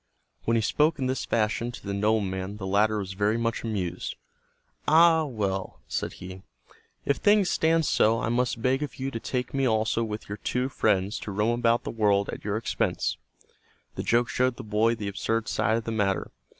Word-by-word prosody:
When 115 - +2
he 115 - +3
spoke 150 +8 +2
in 130 - -2
this 130 +1 -1
fashion 115 +1 0
to - - -10
the 100 - -3
nobleman 100 -2 0
the 95 - -6
latter 105 +3 +2
was 95 -2 -4
very 105 +3 +1
much 115 -1 -1
amused. 95 -6 -3 0.7
"Ah, 160 0 +6
well," 100 -7 -3
said - - -3
he, 95 +1 -9 0.6
"if 140 - +1
things 205 -3 +3
stand 160 0 +2
so 115 -3 +3
I - - -2
must 120 -1 0
beg 130 +2 +2
of 150 - -4
you 135 +1 -4
to 115 - -4
take 125 +1 -3
me 135 -1 +1
also 110 0 +1
with 110 -1 -5
your 100 0 -6
two 125 +5 -1
friends 100 -5 +1
to 105 - -6
roam 110 +4 +1
about 115 0 +2
the - - -4
world 100 -3 +2
at - - -6
your 105 +1 -1
expense." 115 - -1 0.8
The - - -4
joke 120 +1 +2
showed 125 -1 +1
the 130 - -7
boy 110 +2 +2
the 105 -3 -5
absurd 110 +3 -1
side 110 +3 +1
of 115 - -3
the 115 - -4
matter. 100 -4 0
110 Hz, 200 wpm, -27 LUFS, 100-125 Hz, 0.8 s, Ah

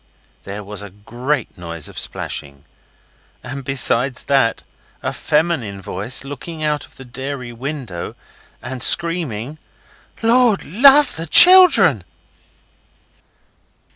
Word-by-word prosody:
There 100 +1 -7
was 100 0 -6
a 105 - -9
great 120 +5 -5
noise 85 -3 -6
of - - -8
splashing. 70 0 -4 0.8
And 130 +2 -7
besides 130 -1 -2
that 135 -5 0 0.4
a - - -3
feminine 150 -11 -1
voice, 100 +8 -3
looking 155 +4 -8
out 150 -1 -2
of - - -20
the 135 - -12
dairy 130 0 -7
window 125 - -7 0.5
and 125 0 -7
screaming 155 -5 +1 0.6
'Lord 235 -2 +2
love 270 - +4
the 165 +1 -6
children! 235 - +7
135 Hz, 105 wpm, -18 LUFS, 110-160 Hz, 0.8 s, children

